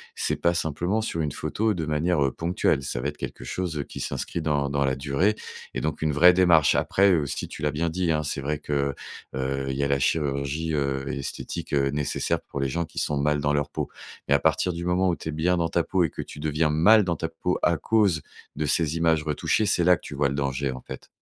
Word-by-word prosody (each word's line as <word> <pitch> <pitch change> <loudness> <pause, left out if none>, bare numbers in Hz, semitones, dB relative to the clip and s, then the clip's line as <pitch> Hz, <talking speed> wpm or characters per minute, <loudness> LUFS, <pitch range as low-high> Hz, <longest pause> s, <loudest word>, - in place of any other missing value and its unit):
c'est - - -1
pas 85 0 +2
simplement 85 +7 0
sur 85 -7 -2
une 75 -2 -1
photo 110 0 -1
de 80 -3 -3
manière, 75 0 +1
heu, 65 - 0
ponctuelle. 85 -4 0
Ça - - -3
va 70 - -1
être 75 - -10
quelque - - -6
chose, 90 -4 -3
heu, 70 - -1
qui - - -9
s'inscrit 85 - -3
dans 75 -2 0
dans 70 0 +1
la 65 -1 +1
durée 75 +10 +1 0.4
et - - -1
donc 80 - -2
une 75 -2 +1
vraie 90 +5 +7
démarche. 85 -4 +5
Après 100 -1 +3
aussi 70 -3 -2
tu - - -9
l'as 75 -1 +1
bien 80 +3 -1
dit, 85 0 0
hein, 75 0 0
c'est 75 -1 -3
vrai 75 +2 -1
que, 70 -2 -1 0.4
heu, 65 +1 -2
il 65 - -2
y 70 - 0
a - - +2
la 70 0 +1
chirurgie, 75 +2 0
heu, 70 -2 -1
esthétique, 70 0 -5
heu, 70 -1 +2
nécessaire 75 0 -1
pour 70 - -7
les 70 -1 0
gens 85 +3 -1
qui - - -19
sont 75 - 0
mal 75 +1 +1
dans 75 0 +1
leur 75 -1 0
peau. - - -3 0.4
Mais 70 - +3
à 70 - +5
partir 90 - +1
du 85 +1 -5
moment 90 +1 +2
où 85 - +1
tu 80 - -7
es - - -1
bien 85 +4 +1
dans 85 -1 0
ta 85 -1 +1
peau 95 -2 +1
et 80 - +1
que - - -6
tu 75 - -11
deviens 75 +1 +1
mal 105 +8 +6
dans 85 -3 -1
ta 80 +1 -3
peau 85 +2 -2
à 85 -2 +3
cause 100 -2 +2 0.3
de 75 - -1
ces 80 +1 +1
images 80 -2 +2
retouchées, 80 +7 0
c'est 85 - +2
là 90 - +5
que 90 - +4
tu - - -8
vois 70 0 +2
le 70 - -3
danger, 70 -1 -1
en 65 - -7
fait. - - -9
75 Hz, 255 wpm, -25 LUFS, 70-85 Hz, 0.4 s, vraie